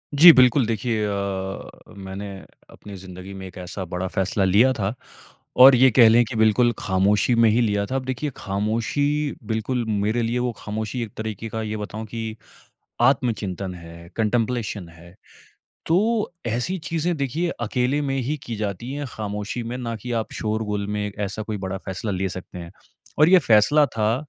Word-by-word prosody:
जी, 170 +4 +11
बिल्कुल। 130 -1 +5
देखिए 110 0 -1
अ, 100 -1 -3 0.3
मैंने 95 +1 -7 0.4
अपनी 105 - -12
ज़िंदगी 95 +1 -10
में 95 -1 -8
एक 95 - -13
ऐसा 90 +1 -6
बड़ा 90 +2 -3
फैसला 95 +1 -1
लिया 105 +8 +4
था, 105 -3 -2 0.6
और 130 +1 +9
ये 130 +2 +6
कह 115 -1 +7
लें 120 +2 +5
कि 115 +2 -7
बिल्कुल 110 +2 +4
खामोशी 100 +4 +2
में 115 -1 +5
ही 115 +3 +3
लिया 105 -3 +1
था। 130 - -4
अब 130 -1 -2
देखिए 130 +3 -2
खामोशी, 115 +9 -1
बिल्कुल 110 +3 -2
मेरे 105 +3 0
लिए 115 +2 -1
वो 125 0 0
खामोशी 110 +3 -4
एक 110 - -8
तरीके 110 0 -5
का 110 +1 -4
ये 110 0 -3
बताऊँ 105 +1 -6
कि 110 0 -5 0.7
आत्मचिंतन 105 -8 0
है, 85 0 -12
कंटेम्प्लेशन 110 -3 -1
है। 85 +1 -16 0.7
तो 210 +5 +1
ऐसी 120 +11 -1
चीज़ें 170 +1 0
देखिए 145 +6 -1
अकेले 125 +5 0
में 135 -2 -1
ही 145 +5 -2
की 115 - -5
जाती 105 +3 -4
हैं, 145 0 -4
खामोशी 105 +2 -4
में, 120 +2 -5
ना 115 -2 -4
कि 115 +3 -7
आप - - -10
शोर 110 +1 -2
गुल 105 -1 -3
में 105 0 -2
ऐसा 105 +1 -3
कोई 105 0 -4
बड़ा 95 0 -4
फैसला 95 +2 -4
ले 95 0 -1
सकते 90 0 -8
हैं। 85 -1 -9 0.5
और 155 +2 +6
ये 185 0 +7
फैसला 130 +8 +5
था 110 +1 +2
110 Hz, 180 wpm, -23 LUFS, 100-125 Hz, 0.7 s, जी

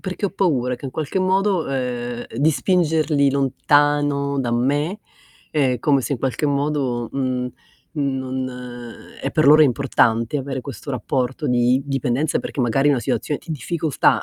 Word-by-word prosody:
perché 185 +2 -5
ho - - -4
paura 135 -11 0
che 125 - -8
in - - -5
qualche 155 +6 -3
modo, 190 -1 +1
ehm, 120 -2 -3
di 145 +6 +3
spingerli 155 -4 +2
lontano 140 +1 +1
da 120 -3 -2
me, 145 - 0 0.5
ehm, 130 -5 +1
come 140 -2 +3
se 135 - -3
in - - -7
qualche 135 +4 -1
modo, 140 -4 -1
uhm, 130 -2 -2 0.4
uhm, 150 -3 -2
non 130 0 -3 0.7
e - - -1
per 155 -3 +2
loro 155 +2 +8
importante, 120 -2 +2
avere 135 -1 -4
questo 140 +2 -8
rapporto 130 +3 -2
di 125 +1 +3
dipendenza 135 +2 0
perché 140 - -4
magari 130 +4 +2
è - - +5
una 135 -4 +1
situazione 130 +3 -2
di 160 - -5
difficoltà, 155 +1 +1
140 Hz, 160 wpm, -21 LUFS, 125-150 Hz, 0.7 s, loro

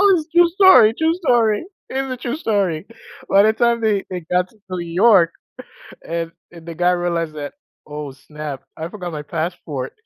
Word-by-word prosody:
it's 315 -3 -3
true 345 0 +6
story 370 - +6
true 320 +1 +2
story. 240 - +1 0.2
It 265 - -4
is 270 -1 -2
a 255 - -4
true 245 +1 -4
story. 200 - -1 0.4
By 200 +1 +5
the 220 +1 +4
time 235 0 +1
they 210 -3 +1
they 180 -1 -4
got 180 0 +2
to - - -25
New 180 -2 -4
York 175 0 +4 0.8
and 165 0 -3 0.2
and 170 -1 -13
the 170 - -6
guy 175 +2 +2
realized 170 -3 -2
that 145 -1 -6 0.3
"Oh, 150 -2 -7
snap. 150 +1 -8
I 160 +1 -5
forgot 180 -2 -7
my 150 -1 -5
passport." 155 -4 -4
180 Hz, 185 wpm, -20 LUFS, 165-235 Hz, 0.8 s, true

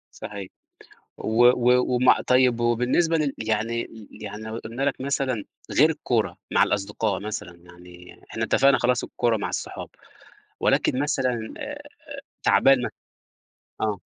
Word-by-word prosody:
صحيح. 100 -2 -7 0.7
و 110 +2 +1
و 125 0 +4
ومع 125 +1 +4
طيب 125 -2 +4
وبالنسبة 125 +8 +2
لل 145 -3 0
يعني 110 +2 -1
ل 110 -3 -12 0.2
يعني 105 +1 -7
لو 110 +1 -5
قُلنا 115 +4 -5
لك 140 -2 -1
مثلًا 135 -5 -1 0.4
غير - - +7
الكورة - - -1
مع - - +4
الأصدقاء 105 0 -1
مثلًا، 100 -4 -6
يعني 90 0 -15
إحنا - - -3
اتفقنا 140 0 +4
خلاص 125 0 +1
الكورة 120 -2 0
مع 105 - -3
الصحاب - - -5 0.7
ولكن 125 - +2
مثلًا 130 -6 -1
آآ - - -7 0.5
تعبان 135 -1 +5 1.0
آه. 105 -2 -1
115 Hz, 130 wpm, -24 LUFS, 105-125 Hz, 1.0 s, غير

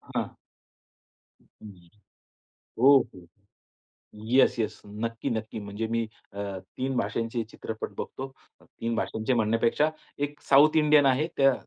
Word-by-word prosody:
हां. - - 0 1.1
हं. 95 -5 -15 1.0
Okay. 120 -10 +4 1.1
Yes 130 -1 +5
yes. 110 -1 -2 0.2
नक्की, 115 0 -3
नक्की 110 -1 -3
म्हणजे 105 +2 -4
मी 115 0 0 0.3
अ, 100 +1 -5 0.3
3 130 0 -2
भाषांचे 115 +2 -1
चित्रपट 110 -1 -6
बघतो. 135 +1 -5 0.3
3 115 0 -4
भाषांचे 110 +3 -1
म्हणण्यापेक्षा 115 +6 +2 0.4
1 145 0 -16
साउथ 145 +3 +6
इंडियन 150 -2 +5
आहे 135 +3 +3
त्या 135 -1 +5
115 Hz, 115 wpm, -27 LUFS, 110-135 Hz, 1.1 s, साउथ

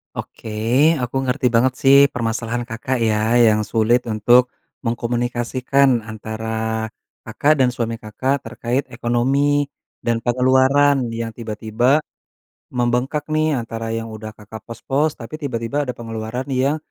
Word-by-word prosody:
Oke, - - -8 0.6
aku 125 +2 -4
ngerti 125 0 +1
banget 125 +2 +3
sih 135 0 +7 0.2
permasalahan 120 0 -2
Kakak 120 +2 -3
ya, 110 +1 +1
yang 110 -3 +5
sulit 120 +2 +2
untuk 120 +3 +4 0.4
mengkomunikasikan 120 +2 +1
antara 110 +1 -3 0.4
Kakak 145 +6 +2
dan 130 -1 +4
suami 115 -1 -3
Kakak 130 +6 -1
terkait 120 +3 -3
ekonomi 135 +5 +1 0.3
dan 115 -1 -1
pengeluaran 130 +1 +3
yang 115 -1 -4
tiba-tiba 115 +5 +1 0.7
membengkak 125 +4 -1
nih 155 -2 +2
antara 115 -1 -5
yang 115 0 -4
udah 110 0 -7
Kakak 105 0 -10
pos-pos, 140 +6 -1
tapi 155 +7 -8
tiba-tiba 130 +1 -2
ada - - -1
pengeluaran 115 +2 -5
yang 135 +4 +1
120 Hz, 125 wpm, -20 LUFS, 115-130 Hz, 0.7 s, sih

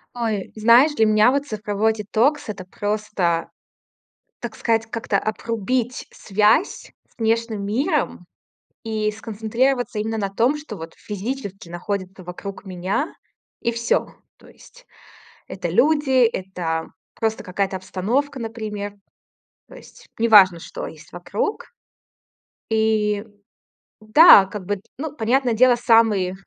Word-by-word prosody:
Ой, 220 -5 -2
знаешь, 235 +7 +5
для 220 - +3
меня 215 +3 +5
вот 280 +1 0
цифровой 215 -2 -1
детокс- 225 +7 0
это 190 -3 -6
просто, 205 -4 -2 0.9
так 230 -2 -6
сказать, 225 -1 0
как-то 225 -2 -2
обрубить 230 +3 -2
связь 210 - +1 0.2
с - - -34
внешним 225 -2 -1
миром 260 - -1 0.6
и 215 -2 -1
сконцентрироваться 225 +3 -1
именно 220 +1 -2
на 200 -2 -1
том, 235 +9 +1
что 290 -8 -9
вот 165 -1 -9
физически 205 -3 -6
находится 185 +1 -5
вокруг 190 +4 -8
меня, 190 - -2 0.5
и 235 - 0
всё. 235 0 0 0.3
То - - -19
есть - - -18 0.6
это - - -5
люди, 280 -4 +3
это 180 -6 -3 0.3
просто 220 -1 -2
какая-то 190 +1 -2
обстановка, 230 +10 -2
например. 215 -3 -5 0.7
То - - -14
есть - - -16
неважно, 205 -6 +6
что - - -7
есть 160 0 -12
вокруг. 200 - -3 1.0
И 215 -2 +1 0.8
да, 215 - +8
как 195 -1 -8
бы, 205 +1 -2 0.2
ну, 300 +1 -5
понятное 250 0 +1
дело, 245 +2 +5
самый 225 -6 +3
220 Hz, 120 wpm, -22 LUFS, 200-240 Hz, 1.0 s, да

